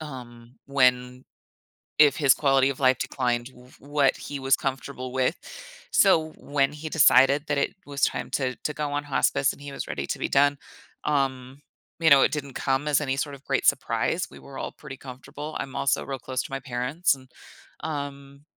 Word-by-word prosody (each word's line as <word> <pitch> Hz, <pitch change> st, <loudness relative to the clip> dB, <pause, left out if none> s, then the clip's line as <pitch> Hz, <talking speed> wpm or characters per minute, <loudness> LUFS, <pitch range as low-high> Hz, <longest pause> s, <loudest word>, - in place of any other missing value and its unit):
um, 120 Hz, -5 st, -10 dB
when 125 Hz, -2 st, +1 dB, 0.7 s
if 145 Hz, -3 st, +6 dB
his 140 Hz, -4 st, +5 dB
quality 135 Hz, -2 st, +3 dB
of 135 Hz, -, -6 dB
life 130 Hz, -1 st, +4 dB
declined, 120 Hz, -3 st, -1 dB
w 125 Hz, -1 st, -18 dB
what 145 Hz, -1 st, +1 dB
he 145 Hz, -, -6 dB
was 135 Hz, 0 st, +3 dB
comfortable 130 Hz, -1 st, -4 dB
with. 130 Hz, +5 st, +1 dB, 0.5 s
So 160 Hz, -5 st, +4 dB
when 140 Hz, -1 st, 0 dB
he 150 Hz, +1 st, -7 dB
decided 140 Hz, -1 st, +5 dB
that 145 Hz, -1 st, 0 dB
it 140 Hz, -, 0 dB
was 140 Hz, -1 st, -6 dB
time -, -, 0 dB
to 130 Hz, -2 st, -1 dB
to 150 Hz, -, -4 dB
go 150 Hz, -1 st, -3 dB
on 145 Hz, 0 st, -2 dB
hospice 135 Hz, -1 st, +1 dB
and -, -, -16 dB
he 145 Hz, -1 st, -8 dB
was -, -, -6 dB
ready -, -, -4 dB
to -, -, -3 dB
be -, -, -1 dB
done, 145 Hz, +1 st, +3 dB, 0.5 s
um, 135 Hz, -2 st, -1 dB, 0.4 s
you 160 Hz, -1 st, +4 dB
know, 140 Hz, -1 st, +8 dB
it -, -, +4 dB
didn't 140 Hz, -3 st, -4 dB
come 135 Hz, +2 st, -1 dB
as 150 Hz, -1 st, +3 dB
any 135 Hz, -3 st, -1 dB
sort 145 Hz, +1 st, -3 dB
of 140 Hz, 0 st, -15 dB
great -, -, 0 dB
surprise, -, -, +1 dB
we -, -, -13 dB
were 140 Hz, -, -12 dB
all -, -, -4 dB
pretty 140 Hz, -3 st, -10 dB
comfortable. 135 Hz, +4 st, -9 dB
I'm 135 Hz, -1 st, -6 dB
also 135 Hz, -, +1 dB
real 135 Hz, -1 st, -4 dB
close 130 Hz, +1 st, -3 dB
to -, -, -10 dB
my 135 Hz, -, -3 dB
parents, 130 Hz, +7 st, 0 dB
and, 130 Hz, -1 st, -16 dB, 0.5 s
um 140 Hz, -2 st, -6 dB
135 Hz, 195 wpm, -25 LUFS, 130-145 Hz, 0.7 s, know